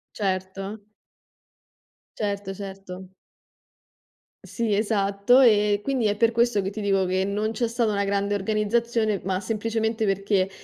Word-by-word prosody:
Certo. 195 +1 -3 1.4
Certo, 200 -2 -3
certo. 190 -1 -9 1.3
Sì, 230 -3 -2
esatto. 205 +3 +2
Ehm, 210 -4 +4
quindi 260 -4 0
è 205 - +1
per 230 +1 +3
questo 235 -3 +2
che 195 - -3
ti 215 +1 -6
dico 195 -2 +2
che 185 +1 0
non 210 +2 -1
c'è 230 +1 -1
stata 230 -1 0
una 200 -1 0
grande 200 0 0
organizzazione, 215 +1 0
ma 185 0 -1
semplicemente 220 +2 -2
perché, 195 -1 +1
205 Hz, 130 wpm, -25 LUFS, 195-220 Hz, 1.4 s, Ehm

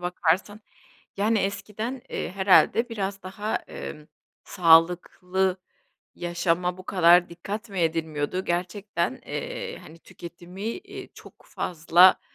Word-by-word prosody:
bakarsan, 180 +4 0 0.6
yani, 215 +2 +2
eskiden, 210 +5 -3
eee, - - -4
herhâlde 195 +5 +4
biraz 195 -3 -4
daha, 205 +3 -3
eee, 150 0 -8 0.4
sağlıklı 180 +2 +3 0.6
yaşama 175 +1 -1
bu 185 - -10
kadar 175 -1 +5
dikkat 200 +6 -6
mi 195 - -5
edilmiyordu 160 +1 -1
gerçekten, 180 +5 -2
eee, - - -5
hani, 165 - -14
tüketimi, 175 +3 -11
eee, 230 - -6
çok - - -14
fazla, 175 +2 +4
185 Hz, 105 wpm, -25 LUFS, 175-205 Hz, 0.6 s, kadar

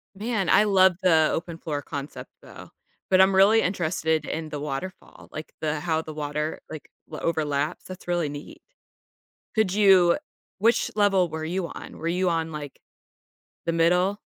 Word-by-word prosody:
Man, 210 -2 -2
I - - +6
love 190 -3 +4
the 160 -4 +4
open 165 0 -4
floor 150 -3 -4
concept, 140 0 -7
though. - - -13 0.4
But 190 0 +5
I'm 190 0 +4
really 210 +4 +6
interested 160 -4 -1
in 160 -1 -4
the 150 -1 -5
waterfall, 150 +6 -7
like, 155 - -8
the 150 -1 -1
how 160 0 -1
the 155 -1 -9
water, 150 +1 -3
like, 155 -2 -9 0.2
overlaps, 155 -1 -2
that's 185 0 -10
really 175 -4 0
neat. 145 +1 -9 0.9
Could 220 -5 +2
you 190 -4 +5 0.4
which 225 +4 +2
level 195 -4 +3
were 160 0 -5
you 175 +2 -2
on? - - -10
Were 165 - -3
you 180 +2 +1
on, 165 -1 -1
like, 145 -3 -7 0.9
the 170 - +1
middle? 180 +4 +2
170 Hz, 160 wpm, -25 LUFS, 155-190 Hz, 0.9 s, I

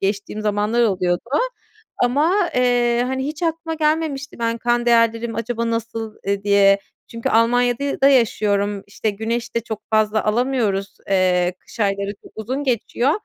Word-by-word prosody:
geçtiğim 200 +2 -2
zamanlar 210 +3 +1
oluyordu. 180 -5 +1 0.8
Ama, 320 +10 +2
eee, 245 -1 +2
hani, 265 +1 -2
hiç 305 +3 -6
aklıma 330 0 -1
gelmemişti 305 -3 -1
ben 230 0 -1
kan 240 0 0
değerlerim 230 -1 +2
acaba 230 0 -2
nasıl, 225 -1 -4
eee, 200 0 0
diye? 200 -1 +5 0.3
Çünkü 230 0 -4
Almanya'da 245 +4 +2
da 275 - +6
yaşıyorum; 205 -5 +2
işte, 210 +1 -2
güneş 230 +4 -3
de - - +3
çok 220 -2 -6
fazla 215 0 +2
alamıyoruz, 215 -4 0
eee, 180 -1 +2
kış 230 - -13
ayları 200 0 0
çok - - -16
uzun 255 +6 -3
geçiyor. 250 +1 0
230 Hz, 145 wpm, -21 LUFS, 205-250 Hz, 0.8 s, da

